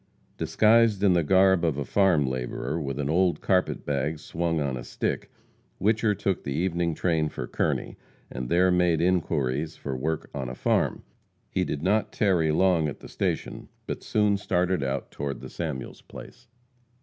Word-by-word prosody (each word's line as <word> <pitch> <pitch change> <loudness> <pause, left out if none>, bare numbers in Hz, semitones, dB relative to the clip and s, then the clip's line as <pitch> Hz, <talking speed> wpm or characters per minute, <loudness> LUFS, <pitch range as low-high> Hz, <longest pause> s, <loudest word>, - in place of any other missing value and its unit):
Disguised 110 -2 +3
in 95 -3 +5
the 85 - +3
garb 95 +2 +4
of 80 -5 +1
a 70 - -2
farm 90 -3 +3
laborer, 65 +5 -3
with 70 -2 -4
an 70 -1 -2
old 90 +3 +2
carpet 90 -1 0
bag 75 +2 -1
swung 80 +1 -2
on 70 -3 -1
a - - -6
stick, - - -3 0.5
Whicher 105 0 +2
took 95 -2 -1
the 70 - -4
evening 85 -1 0
train 80 -3 +1
for 60 - -5
Kearney, - - -2 0.3
and 60 0 -5
there 90 +1 +4
made 90 -2 +3
inquiries 80 -4 0
for 70 -2 -5
work 80 +5 -3
on 65 -3 -4
a 65 - -6
farm. - - 0 0.5
He - - +1
did 75 +1 -3
not 105 +4 +1
tarry 90 -7 +2
long 85 -1 +3
at 75 - -6
the - - -11
station, - - -3 0.2
but - - -4
soon 105 -1 +2
started 95 -4 0
out 70 0 -3
toward 70 -1 -4
the - - -9
Samuels 75 -6 -5
place. - - -12
85 Hz, 175 wpm, -26 LUFS, 70-95 Hz, 0.5 s, in